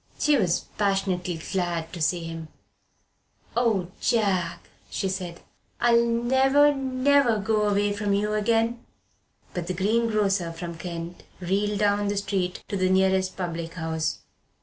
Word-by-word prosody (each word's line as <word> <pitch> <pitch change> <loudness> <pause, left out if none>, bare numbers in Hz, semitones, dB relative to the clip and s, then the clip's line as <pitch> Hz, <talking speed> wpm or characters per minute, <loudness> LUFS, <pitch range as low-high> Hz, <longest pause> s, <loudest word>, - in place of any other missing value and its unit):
She 300 - +3
was 185 -8 +2 0.2
passionately 190 -4 0
glad 175 -4 -2
to 175 - -6
see 170 +2 +1
him. 165 -1 -6 1.1
"Oh, 215 -7 +1
Jack," 195 -7 0 0.2
she 195 - -2
said, 185 -2 -4 0.4
"I'll 235 -1 +4
never, 265 +5 +4
never 265 -2 +2
go 210 0 +1
away 205 0 +1
from 205 0 -2
you 210 +1 0
again!" 225 +2 +1 0.7
But 175 -2 -4
the 185 - -2
greengrocer 205 -3 +1
from 170 0 -7
Kent 170 0 -6 0.2
reeled 200 +3 0
down 205 0 +2
the 205 0 -1
street 190 -2 -2
to - - -2
the 185 0 +2
nearest 190 0 +2
public 170 -2 -4
house. 160 -2 -2
195 Hz, 135 wpm, -25 LUFS, 175-225 Hz, 1.1 s, I'll